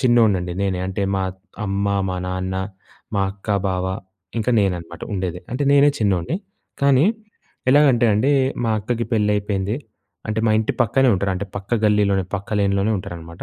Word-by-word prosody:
చిన్నోన్నండి 110 -8 +3
నేనే. 95 -2 0
అంటే 95 +1 -2
మా 95 - 0 0.4
అమ్మ, 100 +1 -1 0.2
మా 90 - -2
నాన్న 95 0 -3 0.6
మా 100 - +2
అక్క, 95 +1 -16 0.2
బావ 90 0 -1 0.5
ఇంకా 115 +2 0
నేనన్నమాట 90 -4 -2
ఉండేది. 90 -3 -2
అంటే 125 +4 -2
నేనే 140 +1 +6
చిన్నోణ్ణి 100 - 0 0.4
కానీ 140 0 +5 0.7
ఎలాగంటే 135 -4 +5
అండి 110 +7 +2 0.3
మా 115 - +1
అక్కకి 115 +3 -2
పెళ్ళైపోయింది. 105 -1 +1 0.5
అంటే 110 +1 0
మా - - +4
ఇంటి 110 - 0
పక్కనే 130 +3 +3
ఉంటారు. 100 +1 0
అంటే 100 +2 -4
పక్క 100 +4 -2
గల్లీలోనే 100 -2 +3
పక్క 100 0 -4
లేన్‌లోనే 100 +1 +1
ఉంటారన్నమాట. 85 -2 -8
100 Hz, 150 wpm, -21 LUFS, 95-115 Hz, 0.7 s, నేనే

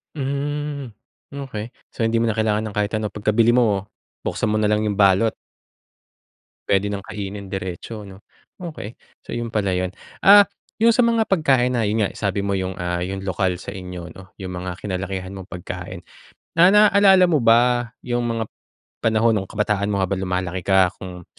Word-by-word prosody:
Hmm, 140 0 -3 0.4
okey. 130 -6 -6 0.2
So, - - -6
hindi 115 0 +2
mo 115 - +2
na 115 - +1
kailangan 110 0 0
ng 105 - -7
kahit 105 0 0
ano, 105 -1 -3
pagkabili 110 +3 +2
mo 105 -6 +2 0.4
buksan - - -1
mo 110 - +1
nalang 105 0 +2
'yong 105 -2 -1
balot? 100 +3 +4 1.4
Puwede 100 0 +3
nang 100 - -4
kainin 100 -1 -7
diretso 95 +3 -6
'no? 95 0 -13 0.4
Okey, 155 - -7 0.3
so, - - -7
'yon 120 -1 -3
pala 100 -4 0
'yon. 90 0 -1 0.3
Ah, 205 +1 +8 0.3
'yong 230 +1 +5
sa 250 - +3
mga 230 -2 +3
pagkain 135 -10 +2
na 120 - +1
'yon 110 0 +1
nga - - -2
sabi 100 -1 -2
mo 100 - 0
'yong, 95 -1 -2
ah, 90 0 -2
'yong 95 +2 -4
lokal 95 -1 0
sa 95 - -8
inyo 90 -3 -8
'no, 95 0 -13
'yong 95 -2 -6
mga 90 0 -5
kinalakihan 95 -1 -4
mong 95 0 -9
pagkain. 90 -2 -7 0.5
Na 180 +4 +7
na 210 0 +7
naalala 190 -3 +6
mo 155 - +3
ba 120 0 +4 0.2
'yong 120 -1 -1
mga, 115 -1 -1 0.6
panahon 115 +1 +3
nung 95 -2 -3
kabataan 105 -1 0
mo 100 - 0
habang 95 0 -1
lumalaki 90 0 -2
ka 95 -1 +4
kung 90 -2 -8
105 Hz, 180 wpm, -22 LUFS, 95-120 Hz, 1.4 s, Ah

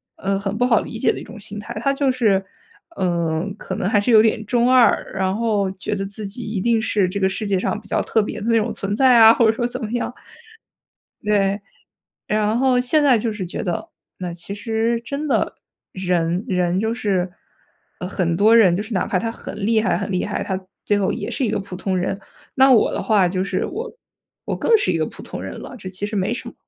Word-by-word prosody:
呃， 195 0 -1
很 200 +1 -3
不 245 - +2
好 230 -3 +4
理 - - -7
解 - - +2
的 - - -6
一 - - -8
种 225 +1 -11
心 210 0 -7
态， 210 - -7
它 275 - +2
就 275 -1 +1
是， 215 -7 +2 0.5
呃， 170 - 0
可 190 - -5
能 185 - -1
还 205 -1 +3
是 205 - -1
有 215 -1 +8
点 220 0 +1
中 240 +3 +2
二。 245 -4 +5
然 190 0 0
后 210 -3 0
觉 195 +2 -5
得 195 -1 -2
自 205 +2 -7
己 215 +5 -5
一 215 -3 -3
定 230 0 +2
是 200 -4 +1
这 200 - -3
个 190 - +3
世 195 +3 -3
界 195 -2 +1
上 210 - -1
比 - - -15
较 - - +1
特 220 - +1
别 215 +1 -5
的 210 - -6
那 230 - +4
种 225 +1 0
存 200 +1 -3
在 255 0 +5
啊， 225 0 +9
或 235 - +3
者 220 - +5
说 240 +2 -1
怎 245 0 -6
么 215 - -4
样 240 - -2 1.1
对， 200 -1 +1 0.7
然 215 +2 +1
后 255 -1 +3
现 290 +4 +2
在 255 -5 +5
就 225 +1 -1
是 195 - -4
觉 175 - -5
得， 175 -3 -3 0.3
那 180 -2 -5
其 175 +4 -6
实 225 +2 -1
真 285 +4 -4
的 - - 0 0.4
人 180 0 0
人 180 -1 0
就 220 +3 0
是， 190 -6 -1 0.7
呃， 180 - -3
很 170 -3 -1
多 215 +4 +5
人， 195 -7 +6
就 200 - -2
是 220 +2 -9
哪 190 - 0
怕 185 - 0
他 225 +2 -2
很 - - -9
厉 225 0 +3
害 - - +1
很 200 - -3
厉 180 - 0
害， 210 - -2
他 190 -1 -3 0.2
最 205 - +2
后 195 - +1
也 - - -4
是 270 - -1
一 - - -1
个 - - -1
普 195 -2 -7
通 190 0 -2
人。 185 +2 -2 0.3
那 265 0 +5
我 230 - +4
的 - - -2
话 205 -4 +3
就 185 +1 -1
是 190 -1 -1
我 465 +6 -5 0.5
我 - - -2
更 460 - +4
是 415 - 0
一 - - 0
个 - - 0
普 - - -11
通 - - -7
人 - - -7
了， - - -9
这 190 - -7
其 185 +2 -6
实 210 - -6
没 195 +2 0
什 - - -6
么。 - - -20
210 Hz, 265 characters per minute, -21 LUFS, 190-230 Hz, 1.1 s, 啊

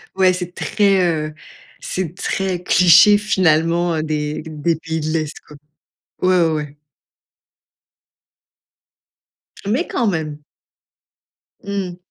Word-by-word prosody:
Ouais 190 -1 +4
c'est 180 -1 -5
très, 200 -2 +1
heu, 155 -3 -1 0.5
c'est 180 -3 -4
très 185 -2 -2
cliché, 180 +4 +6
finalement, 170 -3 +1
heu, 155 - -2
des 150 -1 -3
des 160 +1 -1
pays 160 0 -4
de 155 - -3
l'est, 155 -2 -2
quoi 150 - -14 0.7
ouais, 185 0 +3
ouais, - - 0
ouais. 150 -2 -5 2.9
Mais 215 +5 -1
quand 240 - -1
même! 160 -6 -2 1.3
Mmh. 195 -3 -4
170 Hz, 110 wpm, -19 LUFS, 155-185 Hz, 2.9 s, cliché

